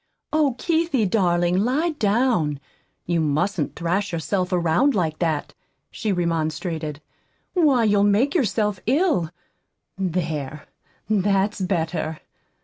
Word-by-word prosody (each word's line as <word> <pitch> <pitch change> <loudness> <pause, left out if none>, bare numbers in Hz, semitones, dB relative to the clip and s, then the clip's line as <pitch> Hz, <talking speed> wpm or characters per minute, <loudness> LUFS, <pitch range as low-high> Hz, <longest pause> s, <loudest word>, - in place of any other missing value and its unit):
"Oh, 295 -5 +2
Keithie, 325 -6 +1
darling, 175 -2 +2
lie 275 - +1
down! 210 - +1 0.5
You 170 -1 0
mustn't 155 +3 0
thrash 180 +4 -1
yourself 180 +4 -1
around 180 - +2
like 160 -5 -1
that," 160 -4 -1 0.4
she 220 -3 -2
remonstrated. 160 -3 -2 0.5
"Why, 290 -9 +3
you'll 205 -2 +3
make 210 +8 +3
yourself 210 - 0
ill. 275 - +2 0.7
There, 155 -6 -3 0.4
that's 200 -1 +1
better. 165 -3 -1
185 Hz, 105 wpm, -23 LUFS, 165-225 Hz, 0.7 s, Why